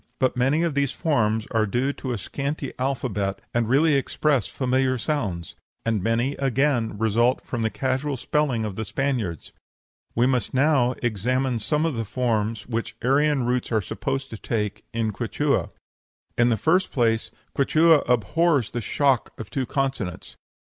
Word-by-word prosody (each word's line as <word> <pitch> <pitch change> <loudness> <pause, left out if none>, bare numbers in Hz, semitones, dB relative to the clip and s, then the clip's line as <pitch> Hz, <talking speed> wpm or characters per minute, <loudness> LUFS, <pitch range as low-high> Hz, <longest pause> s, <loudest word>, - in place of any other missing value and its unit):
But 130 - +1
many 135 +6 +2
of 170 -3 0
these 140 -1 +1
forms 110 -9 +1
are 110 -2 +2
due 125 +7 0
to 130 - -5
a 120 - -1
scanty 140 +6 -4
alphabet, 120 -7 -1
and 115 -2 +1
really 150 +5 +4
express 140 -2 +1
familiar 130 0 0
sounds; 105 - -2 0.3
and 110 -3 +1
many, 115 +6 +1
again, 135 -4 +1
result 115 +4 +2
from 120 - -3
the 110 - +1
casual 130 +3 -1
spelling 130 -4 0
of 105 -3 -4
the 110 - -3
Spaniards. 115 - -2 0.6
We 120 - +3
must 125 -2 0
now 130 -3 +3
examine 120 +3 0
some 150 +8 0
of 165 - 0
the 115 -2 -2
forms 110 -2 -1
which 115 -1 -3
Aryan 140 +1 +3
roots 125 0 -1
are 110 - +3
supposed 135 +7 -3
to 110 - -7
take 105 -2 -2
in 115 -1 -1
Quichua. - - 0 0.7
In 120 0 +4
the 115 - +2
first 180 - +2
place, 115 -3 +1 0.3
Quichua 155 +3 +5
abhors 130 - +2
the 120 - -3
shock 135 +2 +1
of 115 - -7
two 135 -4 -2
consonants. 135 -10 -3
125 Hz, 160 wpm, -24 LUFS, 110-140 Hz, 0.7 s, Quichua